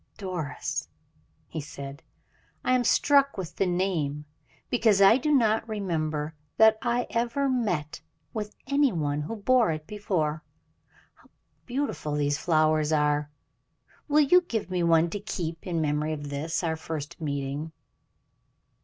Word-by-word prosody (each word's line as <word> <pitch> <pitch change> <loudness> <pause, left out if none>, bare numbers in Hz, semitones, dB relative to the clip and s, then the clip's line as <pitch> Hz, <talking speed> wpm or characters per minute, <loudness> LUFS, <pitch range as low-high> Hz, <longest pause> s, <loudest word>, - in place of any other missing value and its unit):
"Doris!" 180 -7 -4 0.6
he 155 - -5
said; 140 0 -8 0.6
"I 255 - +3
am 250 -1 +3
struck 280 +1 +3
with 185 -4 -6
the 195 - +2
name, 170 -6 -1 0.5
because 220 -5 +3
I 200 +4 +7
do 300 +3 -1
not 225 -5 +3
remember 160 -7 -2 0.2
that 220 0 +6
I 245 -1 0
ever 240 +4 0
met 195 - -1 0.3
with 210 -1 -5
any 280 0 +3
one 150 -4 -1
who 160 +10 -4
bore 230 0 +3
it 155 -1 -5
before. 165 -6 -2 0.7
How - - -25 0.4
beautiful 250 - -2
these 145 0 0
flowers 155 -2 +2
are! 150 -1 +1 0.8
Will 300 0 +4
you 355 +6 +6
give 225 - -4
me 180 -1 0
one 165 0 +3
to 205 - -3
keep 170 -4 -5
in 170 -3 0
memory 150 +1 0
of 145 -1 -6
this, 155 +5 -2
our 160 -1 0
first 160 0 -6
meeting?" 140 +1 -3
170 Hz, 140 wpm, -27 LUFS, 150-225 Hz, 0.8 s, I